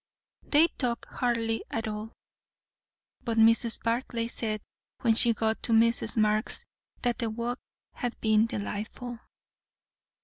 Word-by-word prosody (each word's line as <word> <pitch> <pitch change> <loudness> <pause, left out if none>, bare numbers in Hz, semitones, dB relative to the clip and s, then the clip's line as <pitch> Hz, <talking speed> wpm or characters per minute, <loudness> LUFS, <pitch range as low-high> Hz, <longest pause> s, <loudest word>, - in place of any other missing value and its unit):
They 305 +2 +4
talked 240 -3 -1
hardly 230 -2 -1
at 225 0 -2
all, 215 +1 -5 1.1
but 230 -2 -2
Mrs. 230 +1 +4
Barclay 230 0 -1
said 215 -2 -2 0.4
when 230 -2 +4
she 235 +1 +3
got 220 0 0
to 230 - 0
Mrs. 230 +1 +3
Marx's, 215 0 +1 0.4
that 245 -1 0
the 230 -2 0
walk 235 +3 -3 0.3
had 245 -2 -4
been 220 0 +3
delightful. 220 +3 -5
230 Hz, 125 wpm, -28 LUFS, 220-235 Hz, 1.1 s, They